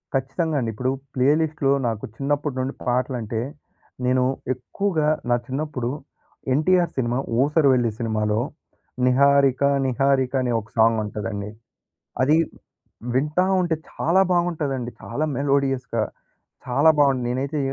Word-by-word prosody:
ఖచ్చితంగా 145 +4 -1
అండి. 115 -3 -1
ఇప్పుడు 125 +4 -1 0.2
ప్లే‌లిస్ట్‌లో 145 +1 +2 0.2
నాకు 110 -2 -3
చిన్నప్పటి 145 0 -1
నుండి 130 +2 -2
పాటలంటే 120 -3 -1 0.6
నేను 125 0 +3 0.3
ఎక్కువగా 155 +5 -1 0.2
నా 120 - +4
చిన్నప్పుడు 135 -3 -3 0.6
'ఎన్‌టి‌ర్' 175 +5 +2
సినిమా 120 -1 0 0.3
'ఊసర‌విల్లి' 135 -6 +3
సినిమాలో 110 -2 0 0.7
'నిహారిక 140 0 +4 0.2
నిహారిక' 135 +1 +1
అనే 125 -1 0
ఒక 110 0 -12
సాంగ్ 110 0 +4
ఉంటదండి. 105 -1 -4 0.7
అది 145 +4 +4 0.8
వింటా 150 +7 +2 0.2
ఉంటే 170 -2 0 0.2
చాలా 180 +4 +2
బాగుంటదండి. 155 -8 -1
చాలా 140 +7 -2
మెలోడియస్‌గా 135 -4 0 0.6
చాలా 125 +5 +4
బాగుంది. 135 -3 +3
నేనైతే 135 +4 -2
135 Hz, 110 wpm, -23 LUFS, 120-150 Hz, 0.8 s, నా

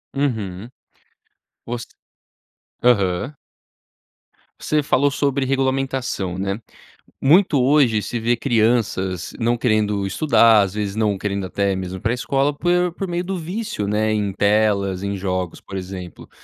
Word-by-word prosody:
Uhum. 110 -7 -2 1.0
Os 120 0 -4 1.0
aham. 105 +2 +2 1.2
Você 150 -1 0
falou 140 +1 +2
sobre 140 -1 0
regulamentação, 130 -8 -1
né? 100 +2 -2 0.6
Muito 150 -1 +4
hoje 130 -5 +3
se 110 +4 -4
vê 120 +1 +1
crianças 110 -7 0
não 120 +1 +1
querendo 105 -4 +1
estudar, 115 -4 +5
às 95 -1 -1
vezes 105 -1 -3
não 105 -3 +1
querendo 100 -1 -2
até 100 +1 0
mesmo 95 0 -5
ir - - -11
pra 115 - 0
escola 135 +3 0
por 175 0 +1
por 195 +1 -4
meio 175 +1 -2
do 190 0 -3
vício, 175 - -4
né, 110 +1 +1
em 105 -2 0
telas, 100 -2 +1
em 100 0 -2
jogos, 90 -2 -3
por 100 - -10
exemplo. 90 -2 -7
110 Hz, 135 wpm, -21 LUFS, 100-135 Hz, 1.2 s, estudar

